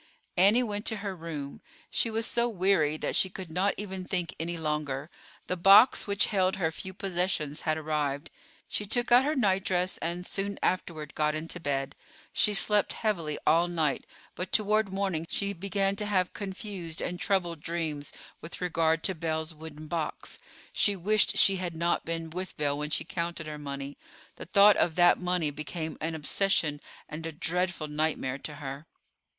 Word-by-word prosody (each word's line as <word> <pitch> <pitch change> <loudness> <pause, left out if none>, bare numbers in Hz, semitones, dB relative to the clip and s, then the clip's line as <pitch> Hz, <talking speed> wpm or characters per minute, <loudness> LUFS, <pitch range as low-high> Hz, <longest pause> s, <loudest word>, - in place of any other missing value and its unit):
Annie 205 +7 +5
went 205 -2 -3
to 220 - +3
her 195 -1 -3
room. 155 -5 -6 0.3
She 230 - +1
was 225 0 -1
so 240 0 +1
weary 185 -7 +2
that - - -1
she 190 - +4
could 185 -3 -8
not 190 +4 +1
even 190 -2 -5
think 180 -2 -2
any 170 +1 -3
longer. 150 -2 -3 0.3
The 180 - -2
box 195 +8 +7
which 200 0 +3
held 190 -1 +2
her 165 -4 0
few 190 +3 -7
possessions 180 -6 -1
had 155 0 0
arrived. 150 -1 -2 0.4
She 210 - -3
took 240 +3 +1
out 245 +2 +8
her 300 +2 +1
nightdress 190 -5 +1
and, 175 +2 -3
soon 200 +1 -3
afterward, 160 -4 -1
got 150 0 +1
into 165 +3 -3
bed. 135 -4 -2 0.4
She 210 - +3
slept 205 0 +3
heavily 170 -9 -1
all 170 +2 +4
night, 160 -6 -1 0.3
but 180 - -5
toward 215 -1 +3
morning 190 -4 -1
she 200 0 -1
began 195 +1 -1
to 210 - -2
have 185 -3 +1
confused 190 -4 -5
and 180 0 -3
troubled 180 -5 0
dreams 155 -3 -3 0.3
with 160 - -8
regard 165 -2 +1
to 190 - +2
Belle's 160 -1 -3
wooden 155 -1 -9
box. 160 0 -4 0.3
She 205 - +3
wished 210 +3 +3
she 195 -1 +6
had 175 -2 -4
not 170 +1 0
been 165 -1 -4
with 185 +2 -5
Belle 145 -1 0
when 150 0 -3
she 155 - +1
counted 170 -2 -4
her 150 -1 -6
money. 140 -1 -6 0.4
The - - -7
thought 200 +3 +6
of 160 - +2
that 175 -1 +5
money 180 -4 0
became 155 +2 -5
an 160 +1 -2
oppression 155 -2 +1 0.3
and 155 +2 -7
a - - -4
dreadful 180 +1 -1
nightmare 150 -3 -1
to 150 - -6
her. 140 +2 -7
170 Hz, 175 wpm, -29 LUFS, 155-195 Hz, 0.4 s, out